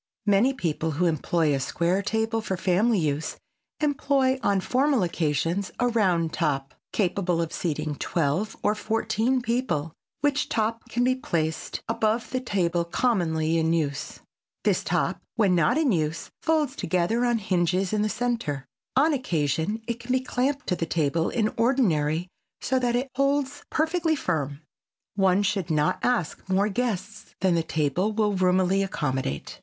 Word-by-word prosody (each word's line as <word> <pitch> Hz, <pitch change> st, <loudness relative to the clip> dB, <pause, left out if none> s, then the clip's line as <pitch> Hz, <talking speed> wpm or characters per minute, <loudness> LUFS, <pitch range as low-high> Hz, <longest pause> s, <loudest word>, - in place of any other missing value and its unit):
Many 205 Hz, +5 st, +4 dB
people 160 Hz, -, -1 dB
who 180 Hz, -, +2 dB
employ 160 Hz, -1 st, +1 dB
a 135 Hz, -, +1 dB
square 170 Hz, +7 st, 0 dB
table 220 Hz, +2 st, 0 dB
for 190 Hz, -3 st, -3 dB
family 200 Hz, +6 st, +2 dB
use, 155 Hz, -2 st, -1 dB, 0.4 s
employ 275 Hz, -3 st, +1 dB
on 200 Hz, -5 st, +2 dB
formal 260 Hz, +3 st, +2 dB
occasions 170 Hz, +3 st, -1 dB
a 245 Hz, -, +3 dB
round 180 Hz, -8 st, +1 dB
top, 135 Hz, -1 st, -1 dB, 0.2 s
capable 180 Hz, -3 st, 0 dB
of 165 Hz, -1 st, -2 dB
seating 155 Hz, -3 st, -2 dB
twelve 170 Hz, +6 st, -1 dB
or 210 Hz, -, +3 dB
fourteen 225 Hz, +3 st, 0 dB
people, 230 Hz, -, -1 dB, 0.3 s
which 290 Hz, 0 st, +1 dB
top 225 Hz, +1 st, -1 dB
can 240 Hz, -, 0 dB
be 255 Hz, +1 st, +3 dB
placed 160 Hz, -11 st, -2 dB
above 225 Hz, +1 st, 0 dB
the 255 Hz, -, 0 dB
table 180 Hz, -8 st, 0 dB
commonly 165 Hz, -5 st, +1 dB
in 160 Hz, 0 st, +1 dB
use. 145 Hz, -3 st, -2 dB, 0.4 s
This -, -, +2 dB
top -, -, 0 dB
when 205 Hz, -6 st, +3 dB
not 170 Hz, -, +3 dB
in 310 Hz, -5 st, +3 dB
use 160 Hz, -2 st, -1 dB
folds 310 Hz, -4 st, +1 dB
together 185 Hz, +6 st, 0 dB
on 240 Hz, -1 st, +2 dB
hinges 185 Hz, -2 st, 0 dB
in 210 Hz, -, +2 dB
the 215 Hz, -, +1 dB
center. 225 Hz, -, -2 dB, 0.3 s
On 300 Hz, +4 st, +4 dB
occasion 175 Hz, -, -1 dB
it 235 Hz, 0 st, -2 dB
can 240 Hz, +1 st, -5 dB
be 255 Hz, -, +3 dB
clamped 270 Hz, +3 st, -1 dB
to 180 Hz, -, 0 dB
the 165 Hz, -, -3 dB
table 160 Hz, 0 st, +1 dB
in 220 Hz, -3 st, 0 dB
ordinary 180 Hz, -, +2 dB, 0.3 s
so 260 Hz, 0 st, 0 dB
that 245 Hz, -1 st, +1 dB
it 255 Hz, +2 st, -1 dB
holds 280 Hz, +1 st, 0 dB
perfectly 320 Hz, +1 st, +1 dB
firm. 145 Hz, -, -2 dB, 0.5 s
One 195 Hz, 0 st, +3 dB
should 195 Hz, -3 st, -1 dB
not 150 Hz, -2 st, +1 dB
ask 225 Hz, -7 st, -1 dB
more 195 Hz, +3 st, +2 dB
guests 215 Hz, -3 st, -3 dB
than 185 Hz, -1 st, +3 dB
the 170 Hz, -, +2 dB
table 160 Hz, +5 st, 0 dB
will 210 Hz, -1 st, +1 dB
roomily 185 Hz, +1 st, +2 dB
accommodate. 130 Hz, -, -3 dB
195 Hz, 155 wpm, -26 LUFS, 165-245 Hz, 0.5 s, Many